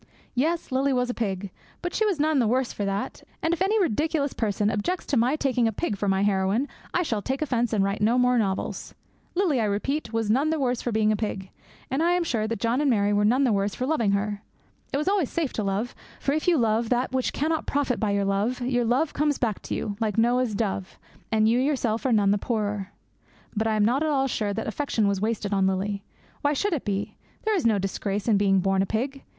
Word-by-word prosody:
Yes, 320 +6 0
Lily 270 +2 +2
was 250 -1 +1
a - - -5
pig, 200 -4 -3 0.3
but 350 - -3
she 435 - +2
was 380 -7 0
none 305 -1 +2
the 235 - +3
worse 255 +2 +1
for 205 - -3
that; 195 +1 -3 0.2
and 325 - +2
if 345 - -3
any 415 +3 +3
ridiculous 305 - 0
person 210 -1 0
objects 345 - -2
to - - -1
my 250 +4 +3
taking 255 -5 +1
a - - +1
pig 220 +1 -2
for 200 +1 -2
my 195 0 +2
heroine, 200 +6 +1 0.2
I 360 - +1
shall 225 -10 -1
take 265 +7 -2
offence 240 -5 0
and 210 -3 +2
write 200 +1 -1
no 225 +4 +3
more 250 -1 +4
novels. 195 -3 -2 0.4
Lily, 340 -10 +2
I - - +1
repeat, 220 +6 -1
was 225 -1 -1
none 275 +7 +2
the 320 - +1
worse 250 -3 0
for 240 - -2
being 215 -1 +2
a - - +2
pig. 200 -3 -4 0.4
And 270 +4 +1
I 345 +2 +3
am 355 -1 +2
sure 225 -9 -1
that 225 -2 -3
John 235 +6 +1
and 295 - +2
Mary 205 -4 +2
were 205 0 +2
none 250 +6 +3
the 245 -5 +3
worse 200 0 0
for 255 - -2
loving 235 -9 +1
her. 205 0 -1 0.5
It - - 0
is 300 - -2
always 385 -8 +2
safe 320 -6 -2
to 215 - -2
love, 200 +5 -1 0.3
for 275 - 0
if 310 +3 -1
you 350 -2 +5
love 225 -1 +1
that 250 +1 +1
which 260 -1 0
cannot 315 +2 -1
profit 280 -3 0
by 215 - 0
your 200 0 +1
love, 205 +6 0
your 245 -1 +1
love 255 +7 +1
comes 295 -1 +1
back 220 -5 -1
to - - -4
you, 205 -1 -3
like 220 -3 -1
Noah's 240 -1 +2
dove, 195 -3 -2 0.3
and 220 -1 +3
you 235 +2 +3
yourself 255 -4 0
are - - +1
none 205 -3 +4
the 205 - +2
poorer. 205 -4 -2 0.6
But 220 +1 +1
I 220 - +1
am 210 -1 +3
not 250 +6 +2
at 315 - +1
all 270 -2 +2
sure 215 -5 -1
that 225 +2 -3
affection 225 -3 0
was 200 -1 0
wasted 210 -2 -1
on 195 -1 +3
Lily. 195 +1 -1 0.4
Why 290 +1 +2
should 395 +7 0
it 300 - -2
be? 200 -1 -3 0.3
There 435 -1 +2
is 340 -11 +2
no 220 -2 +3
disgrace 195 +2 -2
in 215 -3 +4
being 195 -1 +3
born 195 0 +2
a 195 - 0
pig. 265 +6 -2
230 Hz, 245 wpm, -25 LUFS, 205-275 Hz, 0.6 s, you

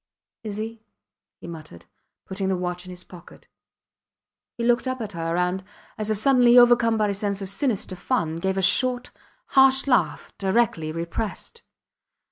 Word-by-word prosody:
Is 210 -2 -5
he? 220 +1 -6 0.6
he - - -11
muttered, 155 - -11 0.4
putting 190 0 -3
the 190 - 0
watch 180 0 -4
in - - -9
his 180 0 -9
pocket. 175 -2 -15 1.1
He 235 - -3
looked 240 +2 +2
up 255 0 -2
at 215 -3 -5
her, 165 -1 -3
and, 180 +1 0 0.3
as 215 0 -4
if 215 - +1
suddenly 245 +1 +5
overcome 240 -2 +5
by 210 -1 +1
a - - 0
sense 200 0 -2
of 195 -2 -4
sinister 200 -3 -2
fun, 175 -5 -1
gave 190 +3 -2
a 190 - 0
short, 250 +5 +2 0.4
harsh 265 0 +5
laugh, 250 -4 0
directly 190 -6 +1
repressed. 170 - -5
200 Hz, 160 wpm, -24 LUFS, 180-240 Hz, 1.1 s, suddenly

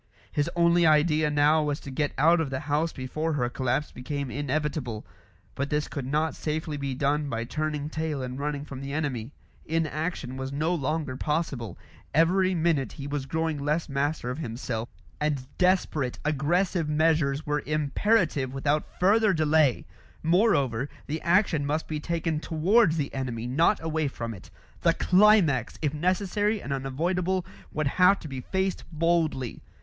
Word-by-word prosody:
His 145 -1 0
only 170 0 +4
idea 155 -1 +4
now 150 +2 +4
was 150 -1 -1
to 140 - -8
get 145 +2 0
out 165 +4 +5
of 155 - -2
the 130 0 -3
house 150 +3 0
before 155 +5 -3
her 125 -4 0
collapse 130 +3 -1
became 140 +1 -4
inevitable; 145 -5 -2 0.5
but 140 +1 -3
this 150 -1 0
could 135 -3 -5
not 155 +3 0
safely 155 0 -3
be 140 -2 -3
done 145 +2 0
by 115 -2 -2
turning 150 +3 -2
tail 155 -3 -3
and 125 +1 -5
running 145 0 -3
from 135 -2 -8
the 140 0 -5
enemy. 140 -6 -2 0.3
Inaction 155 -4 -2
was 130 0 -4
no 155 +5 0
longer 155 -3 -2
possible; 140 - -2 0.4
every 185 +4 +3
minute 160 -5 +1
he 140 - -7
was 145 -1 -3
growing 160 0 -1
less 150 +4 0
master 140 -2 -1
of 130 - -5
himself, 115 -4 -4 0.3
and 150 -3 -1
desperate, 180 -8 +1
aggressive 160 +3 +1
measures 150 -2 +2
were 150 0 0
imperative 150 - +1
without 145 +2 -1
further 210 +2 +4
delay. 155 -4 +3 0.4
Moreover, 145 - +2 0.2
the 155 +2 -4
action 175 -4 +2
must 150 +3 -1
be 155 -1 -3
taken 165 0 -1
towards 170 +3 +3
the 145 -3 -2
enemy, 125 -4 -3
not 160 +11 +2
away 160 -2 0
from 115 -4 -5
it; 95 - -12 0.3
the - - +3
climax, 180 - +4
if 150 -2 -1
necessary 195 +6 0
and 140 - -4
unavoidable, 170 +7 -1 0.3
would 155 0 -1 0.2
have 195 +2 +7
to - - -7
be 135 -2 -5
faced 190 +5 -1
boldly. 160 -6 0
150 Hz, 160 wpm, -27 LUFS, 140-165 Hz, 0.5 s, have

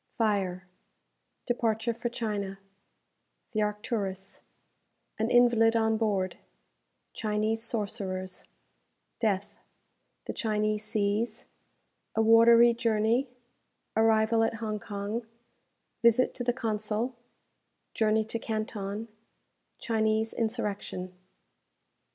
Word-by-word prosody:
Fire 190 -5 0 0.8
Departure 230 -1 0
for 235 +1 -3
China 205 -5 -3 0.9
The 215 -3 0
"Arcturus" 205 -2 -3 0.8
An 220 +1 +1
Invalid 235 -2 +5
on 220 -1 +2
Board 200 -4 0 0.7
Chinese 215 0 -1
Sorcerers 195 -5 -4 0.8
Death 205 -3 -1 0.7
The - - -4
Chinese 215 -1 0
Seas 215 +1 -1 0.7
A 225 - +3
Watery 230 +1 +7
Journey 230 +3 +1 0.7
Arrival 225 0 +4
at 225 - 0
Hong 215 -2 -3
Kong 205 +3 -4 0.7
Visit 235 +2 +4
to 245 - -3
the 245 - +2
Consul 225 0 -2 0.8
Journey 220 0 +2
to 230 +1 -3
Canton 215 -1 -4 0.7
Chinese 220 -1 0
Insurrection. 210 -5 -3
220 Hz, 85 wpm, -29 LUFS, 210-230 Hz, 0.9 s, Watery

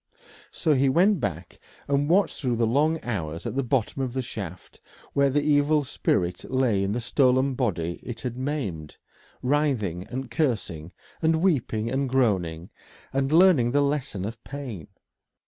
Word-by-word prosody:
So 160 -3 +1
he 135 0 +3
went 185 +7 +4
back 85 - -4 0.3
and 140 +1 +1
watched 185 -2 +2
through 125 -4 0
the 115 0 +2
long 150 +8 +2
hours 85 -8 -4
at - - -3
the 135 - +1
bottom 130 0 -1
of 130 -2 -2
the 130 0 -2
shaft 95 -7 -8 0.3
where 140 0 +3
the 145 +2 +1
evil 150 0 +3
spirit 90 -8 -1
lay 125 -7 +2
in 100 +1 -1
the 120 - -1
stolen 130 +2 +2
body 85 -10 -2
it 120 -2 -7
had 125 -2 -4
maimed, 125 - -4 0.5
writhing 125 - 0
and 130 -1 -5
cursing, 105 - -1 0.3
and 160 0 +3
weeping 115 - +1
and 135 0 0
groaning, 95 -10 0 0.4
and 135 +1 0
learning 165 -8 +5
the 145 - +4
lesson 140 -9 -1
of 115 +1 -7
pain. 125 - -7
130 Hz, 160 wpm, -25 LUFS, 105-145 Hz, 0.5 s, learning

